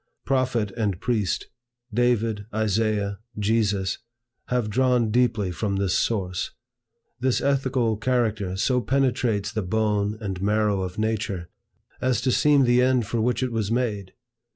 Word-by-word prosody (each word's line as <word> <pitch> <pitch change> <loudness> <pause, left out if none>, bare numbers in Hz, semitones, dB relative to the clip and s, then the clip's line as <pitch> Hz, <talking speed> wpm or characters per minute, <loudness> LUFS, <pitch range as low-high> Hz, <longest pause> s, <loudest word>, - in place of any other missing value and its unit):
Prophet 130 -6 +1
and 100 -3 -2
priest, 105 -7 -1 0.5
David, 115 -3 +1
Isaiah, 105 -1 0 0.2
Jesus, 105 -3 0 0.5
have 125 -3 0
drawn 125 0 +2
deeply 115 -5 +2
from 100 +3 -2
this 95 -2 0
source. 90 -5 -1 0.7
This 130 0 +1
ethical 130 -5 +1
character 110 -6 0
so 125 +5 +2
penetrates 120 -4 0
the 110 - -2
bone 105 +1 0
and 95 -4 -4
marrow 105 -1 +1
of 90 0 -5
nature, 110 -5 -2 0.5
as 125 -3 +1
to 130 - +1
seem 145 +1 +4
the 120 0 +4
end 125 -2 +3
for 115 +2 -1
which 125 +3 +1
it 130 - -1
was 110 -3 -1
made. 105 -6 -1
110 Hz, 135 wpm, -24 LUFS, 100-125 Hz, 0.7 s, seem